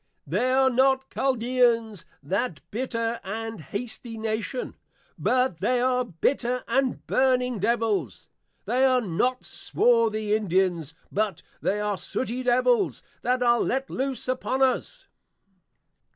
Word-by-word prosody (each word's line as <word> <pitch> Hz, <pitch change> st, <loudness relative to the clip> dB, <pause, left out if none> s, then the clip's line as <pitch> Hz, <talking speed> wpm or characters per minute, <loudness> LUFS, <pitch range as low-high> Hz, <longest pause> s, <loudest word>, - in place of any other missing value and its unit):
They 255 Hz, -, 0 dB
are 265 Hz, 0 st, +4 dB
not 265 Hz, +1 st, +2 dB
Chaldeans, 235 Hz, -5 st, +1 dB, 0.2 s
that 180 Hz, -, -1 dB
Bitter 230 Hz, 0 st, -2 dB
and 220 Hz, 0 st, -5 dB
Hasty 225 Hz, -, -5 dB
Nation, 220 Hz, +3 st, -3 dB, 0.5 s
but 255 Hz, -9 st, +1 dB
they 250 Hz, +6 st, +1 dB
are, 250 Hz, 0 st, +2 dB
Bitter 245 Hz, -, -1 dB
and 260 Hz, +1 st, 0 dB
Burning 250 Hz, -3 st, +2 dB
Devils; 210 Hz, -, 0 dB, 0.4 s
They 245 Hz, +5 st, +1 dB
are 255 Hz, -1 st, +4 dB
not 245 Hz, +6 st, -1 dB
Swarthy 220 Hz, -3 st, +1 dB
Indians, 185 Hz, -6 st, 0 dB, 0.2 s
but 210 Hz, 0 st, -1 dB, 0.2 s
they 205 Hz, -, 0 dB
are 210 Hz, -2 st, -1 dB
Sooty 255 Hz, 0 st, -3 dB
Devils; 255 Hz, -, +2 dB, 0.2 s
that 250 Hz, 0 st, +1 dB
are 240 Hz, -1 st, +4 dB
let 270 Hz, +1 st, -1 dB
loose 265 Hz, -1 st, -3 dB
upon 255 Hz, +1 st, 0 dB
us. 265 Hz, -, 0 dB
240 Hz, 120 wpm, -26 LUFS, 215-255 Hz, 0.5 s, are